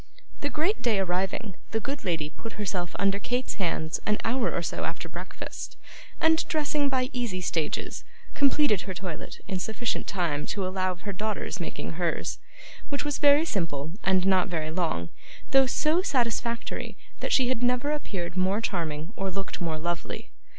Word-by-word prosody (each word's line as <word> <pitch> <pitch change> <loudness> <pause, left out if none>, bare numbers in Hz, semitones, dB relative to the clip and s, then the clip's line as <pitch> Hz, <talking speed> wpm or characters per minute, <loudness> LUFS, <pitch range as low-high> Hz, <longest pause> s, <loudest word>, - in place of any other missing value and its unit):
The 285 - -1
great 330 +9 +1
day 230 -4 +3
arriving, 190 +1 0
the 225 - 0
good 280 +4 -3
lady 160 -4 0
put 225 - -7
herself 190 -4 -2
under 200 0 +3
Kate's 245 +4 -1
hands 160 -2 0
an 210 0 +3
hour 245 +1 +2
or - - -1
so - - -2
after - - -3
breakfast, - - -6 0.4
and, 320 0 +5
dressing 295 -2 +2
by 260 0 +1
easy 235 -7 -1
stages, 165 -3 -1 0.3
completed 280 -7 +4
her 190 -2 -5
toilette 175 -4 -5
in 190 -3 -1
sufficient 220 +4 -1
time 165 -6 0
to 200 -2 -1
allow 185 0 +1
of 180 - -8
her 200 - -3
daughter's 210 0 -2
making 170 - -3
hers, 170 -2 0 0.5
which 285 0 -1
was 290 -1 0
very 290 +2 +7
simple, 160 - -1
and 185 -1 +4
not 190 -1 +5
very 160 -4 -2
long, 160 - 0 0.4
though 270 -1 +7
so 310 +7 +3
satisfactory 235 - 0 0.2
that - - -2
she 255 -2 +5
had 255 -2 +1
never 250 +4 +2
appeared 190 -13 -3
more 190 +3 +3
charming 165 -5 -2
or 195 0 -1
looked 195 0 -4
more 165 -2 0
lovely. 170 +2 -3
195 Hz, 170 wpm, -28 LUFS, 175-255 Hz, 0.5 s, very